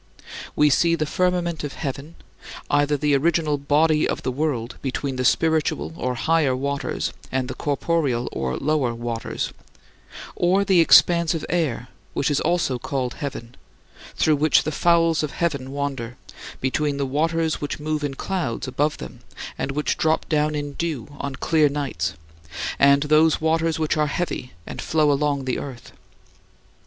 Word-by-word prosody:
We 150 0 +4
see 170 +4 +3
the 155 -2 -1
firmament 175 -1 0
of 145 - -4
heaven, 140 +3 -5 0.6
either 145 0 +3
the 145 0 +2
original 155 0 +1
"body" 150 +2 +2
of - - -3
the 130 - -1
world 125 -4 -2
between 135 0 -3
the 130 - -2
spiritual 160 +4 +1 0.2
(higher) 150 0 +2
waters 140 +2 -2 0.2
and 130 -1 -1
the 130 - -4
corporeal 145 -4 0
(lower) 120 - -1
waters 115 -1 -4 0.8
or 185 +3 +2
the 190 -3 +4
expanse 170 0 +5
of 160 - -4
air 150 -8 -1 0.2
which 140 - 0
is 145 - +2
also 170 -8 0
called 125 -1 -2
"heaven" 125 -4 -6 0.6
through 155 -2 +3
which 155 +1 +4
the 155 - -2
fowls 165 +1 +3
of 150 -3 -3
heaven 140 -6 -1
wander, 135 -4 -4 0.4
between 140 +2 0
the 140 - 0
waters 160 +4 0
which 145 - -3
move 155 0 -2
in 140 -2 -2
clouds 165 -9 -3
above 145 +4 0
them - - -9 0.4
and 140 - -3
which 150 +1 -1
drop 160 0 +1
down 150 -1 +1
in 145 -1 -3
dew 150 -7 -3
on 140 -1 -4
clear 155 +2 +3
nights, 140 - -3 0.6
and 140 +1 +5
those 155 +1 +4
waters 160 0 +1
which 155 0 0
are 150 0 +2
heavy 145 -4 -3
and - - -6
flow 155 -2 +2
along 140 -1 0
the 130 - -1
earth. 125 -4 -8
150 Hz, 155 wpm, -23 LUFS, 135-160 Hz, 0.8 s, expanse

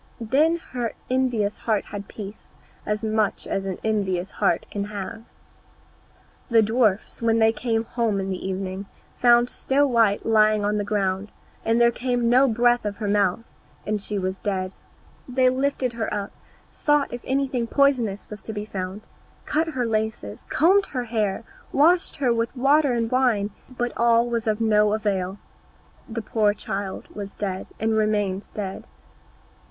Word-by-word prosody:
Then 280 +9 +3 0.2
her 240 -3 -2 0.2
envious 245 -6 +1
heart 215 -3 0
had 205 -1 -7
peace, 205 0 -9 0.4
as 210 +1 -1
much 215 -2 0
as 195 0 -2
an 190 - -3
envious 195 -4 -1
heart - - +1
can 200 -1 -2
have. 205 +2 -6 1.2
The 230 -2 +5
dwarfs, 220 -2 +1
when 230 -1 +3
they 220 0 +5
came 225 0 -1
home 230 -3 -1
in 195 0 -3
the 185 0 -4
evening, 190 +1 -4 0.3
found 240 0 +5
Snow 275 +3 +1
white 230 -6 +2
lying 215 -2 +4
on 210 +1 +1
the - - 0
ground, 200 0 -1 0.3
and 225 +1 +2
there 235 0 +5
came 245 -1 0
no 260 +3 +6
breath 240 +1 +3
out 210 - 0
of 200 - -9
her 215 - -3
mouth, 200 0 +2 0.4
and 210 -1 -1
she 205 +1 -3
was 190 0 -2
dead. 190 -2 -2 0.6
They 255 0 +3
lifted 260 -1 0
her 230 -1 -3
up, 205 -1 -3 0.4
sought 295 -3 +1
if 240 - -5
anything 265 -3 0
poisonous 245 -8 +2
was 210 0 -9
to 220 - -7
be 210 0 -4
found, 190 0 -5 0.4
cut 320 +2 +1
her 260 -6 -1
laces, 215 - -3
combed 385 +6 +4
her 250 -3 -3
hair, 220 -3 -1 0.3
washed 340 +5 +3
her 260 -5 +2
with 230 +3 -2
water 280 +1 +4
and 230 -1 -1
wine, 240 -6 +2 0.2
but 245 -1 -3
all 235 0 +4
was 235 -1 -2
of 215 0 +1
no 210 -2 +3
avail, 195 -3 -1 0.7
the 225 0 -4
poor 210 -1 +2
child 195 -2 -5
was 200 -1 -8
dead, 190 -2 -3
and 220 +1 +1
remained 210 -3 0
dead. 195 -2 -5
220 Hz, 165 wpm, -24 LUFS, 205-245 Hz, 1.2 s, no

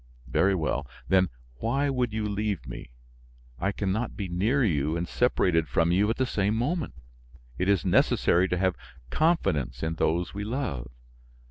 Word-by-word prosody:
Very 95 +10 +2
well, 70 -5 -1 0.2
then 95 -1 +4 0.3
why 135 - 0
would 125 -3 0
you 110 0 -2
leave 100 - -2
me? - - -8 0.7
I 95 - 0
can 100 -1 -2
not 110 +4 -2
be 100 - -3
near 105 +11 +1
you 80 - +1
and 85 +1 -2
separated 90 -10 +2
from 85 +7 +2
you 100 +4 +3
at 115 - +1
the 130 - +2
same 105 -3 0
moment. 150 +7 -1 0.6
It 95 +2 +1
is 100 -4 +2
necessary 90 +2 +3
to 90 - -1
have 95 -1 +1 0.4
confidence 70 - +1
in 80 0 0
those 85 +2 0
we 100 +1 -4
love. 105 - -3
95 Hz, 165 wpm, -27 LUFS, 80-110 Hz, 0.7 s, then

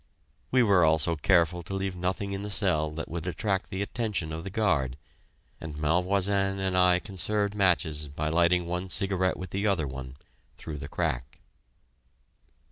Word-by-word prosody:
We 130 -1 +4
were 100 -6 +4
also 80 +1 +4
careful 85 +1 +2
to 95 +3 -6
leave 95 -1 -2
nothing 95 +2 -2
in 100 - -3
the 105 - -5
cell 90 -7 +2
that 80 +2 -6
would 85 +1 -5
attract 95 +2 -2
the 95 0 -2
attention 100 -8 -3
of 80 +1 -5
the 95 - -5
guard, 80 - 0 0.6
and 75 -2 -7
Malvoisin 95 +5 +1
and 95 -1 -1
I 90 -1 +5
conserved 100 +3 -1
matches 85 -6 +1
by 75 +2 -3
lighting 85 +2 +3
one 90 +2 -3
cigarette 95 -1 +1
with 95 - -7
the 100 +2 -1
other 90 -7 +1
one, 65 -1 -7 0.4
through 75 -2 -7
the 70 - -6
crack. 60 -2 -3
90 Hz, 165 wpm, -28 LUFS, 80-100 Hz, 0.6 s, I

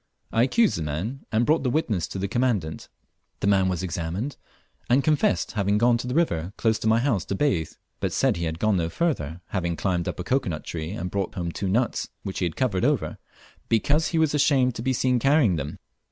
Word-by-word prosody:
I 115 - +2
accused 205 - +3
the - - -3
man 85 - -4
and 115 +1 +2
brought 155 +4 +3
the 130 - 0
witnesses 115 - 0
to - - -6
the 95 +1 -1
Commandant. 100 -10 -1 0.5
The - - -2
man 95 -2 +3
was 90 0 -2
examined, 90 - -3 0.5
and 130 +3 +4
confessed 155 +7 +2
having 100 0 +1
gone 120 +1 +3
to 125 - -4
the 125 - -2
river 95 - 0
close 110 -1 +1
to 110 - -2
my 110 +1 +5
house 120 -7 +1
to 95 - -2
bathe; 95 - 0 0.3
but - - -1
said - - +2
he 85 - -2
had 80 0 -3
gone 105 +2 +2
no 85 -1 0
farther, 85 - -2
having 85 -3 -1
climbed 90 -1 -1
up - - -4
a - - -2
cocoa 130 -3 0
nut 75 -2 -4
tree 80 -1 -5
and 90 -2 -4
brought 100 -2 -2
home 85 -2 -2
two 95 +3 -3
nuts, 115 +4 0
which 95 - -4
he 90 - +1
had 85 - -3
covered 105 -9 0
over, - - 0 0.5
_because 145 +8 +2
he 165 - -1
was 160 -2 +3
ashamed 135 -4 +3
to 115 - -6
be 130 +2 0
seen 125 0 +2
carrying 135 - +4
them! 70 0 -5
105 Hz, 225 wpm, -25 LUFS, 90-130 Hz, 0.5 s, my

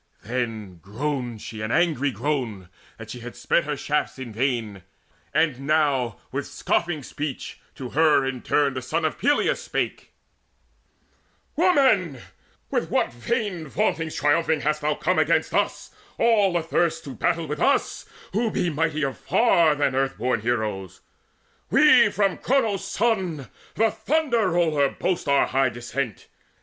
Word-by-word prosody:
Then 110 -6 -4
groaned 120 +1 -4
she 110 -1 -7
an 110 - -3
angry 155 -4 +2
groan 120 -7 -3 0.3
that 115 -1 -9
she 125 - -7
had 120 +1 -9
sped 170 - +1
Her 150 -1 -3
shafts 150 0 -1
in 125 -4 -7
vain; 115 -5 -2 0.5
and 150 -4 +1
now 140 -5 +1
with - - -3
scoffing 170 -4 -1
speech 145 0 -6 0.2
To 130 -2 -7
her 150 -2 +3
in 130 -2 -3
turn 145 -2 +1
the 130 - -4
son 160 +6 -1
of 155 - -2
Peleus 290 - +2
spake: - - -3 1.4
"Woman, 265 - +3 0.5
with - - -1
what - - 0
vain 190 - -2
vauntings 165 -1 -1
triumphing 155 +1 +2
Hast 150 +1 0
thou 150 0 0
come - - 0
forth - - +3
against - - +1
us, - - -1 0.3
all 205 -6 +3
athirst 165 0 0
To 140 - -7
battle 165 +5 0
with 150 0 -4
us, 280 - +1 0.3
who 225 +3 +1
be 175 -4 -1
mightier 150 -3 -1
far 170 - +3
Than 145 -2 +1
earthborn 130 -3 0
heroes? 105 -6 -3 0.7
We - - +6
from 195 -1 0
Cronos' 225 -7 +1
Son, 190 - -1 0.3
The 225 +1 +2
Thunder 235 -3 +1
roller, 160 -5 +2
boast 180 -4 -2
our 140 0 +4
high 135 0 +1
descent. 120 -1 -5
150 Hz, 145 wpm, -24 LUFS, 125-175 Hz, 1.4 s, We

